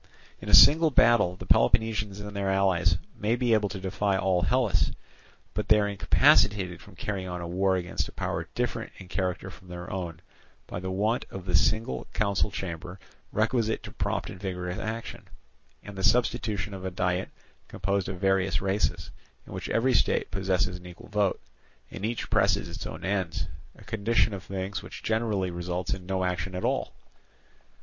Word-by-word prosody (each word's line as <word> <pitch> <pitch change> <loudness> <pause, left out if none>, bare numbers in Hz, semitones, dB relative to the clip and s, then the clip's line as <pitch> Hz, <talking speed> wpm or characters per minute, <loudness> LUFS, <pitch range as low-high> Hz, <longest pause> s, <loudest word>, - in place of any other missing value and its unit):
In - - -6
a - - +8
single 160 +2 +8
battle 115 -9 +4
the 95 - -9
Peloponnesians 105 +3 +2
and 105 0 -7
their 100 -1 -1
allies 95 -3 +3 0.2
may 110 +3 0
be 120 -1 +2
able 105 -2 +2
to 95 0 -5
defy 95 +1 0
all 95 -2 +2
Hellas, 120 +4 +2 0.6
but 105 +3 -2
they 105 - +6
are 100 - +1
incapacitated 100 -1 +3
from - - -15
carrying 95 -3 -3
on 90 -1 -4
a 85 - -5
war 95 +2 +2
against 90 -1 -2
a - - -10
power - - -3
different - - -2
in 95 - -11
character 95 +1 -2
from 90 - -15
their 90 0 -7
own, 85 -4 -4 0.5
by - - -5
the 95 +1 -4
want 105 +6 0
of 95 -2 -8
the 90 -1 +1
single 90 - +1
council 100 0 +1
chamber 90 -1 -6 0.3
requisite 110 0 +1
to - - -8
prompt - - -2
and 95 - -10
vigorous 90 -2 -4
action, 110 +1 -5 0.6
and 105 - -9
the 95 - -5
substitution 105 -4 +1
of 95 -1 -7
a 95 - -2
diet 90 0 -1 0.4
composed 100 +1 -1
of 95 -2 -5
various 95 -2 +2
races, 95 +1 -1 0.3
in - - -10
which - - -5
every 130 +3 +2
state - - +2
possesses 95 -2 0
an 90 0 -12
equal 90 +3 -12
vote, 105 -2 +1 0.5
and - - -7
each 115 0 -3
presses - - +3
its - - -6
own - - -7
ends, 95 -4 -1 0.3
a - - -15
condition 110 0 +1
of 100 - -5
things 95 0 -4
which 95 - -10
generally 110 -5 0
results 90 +1 -2
in 90 -1 -7
no 95 -1 0
action 90 0 -2
at 90 - -2
all. - - -1
95 Hz, 180 wpm, -28 LUFS, 90-105 Hz, 0.6 s, a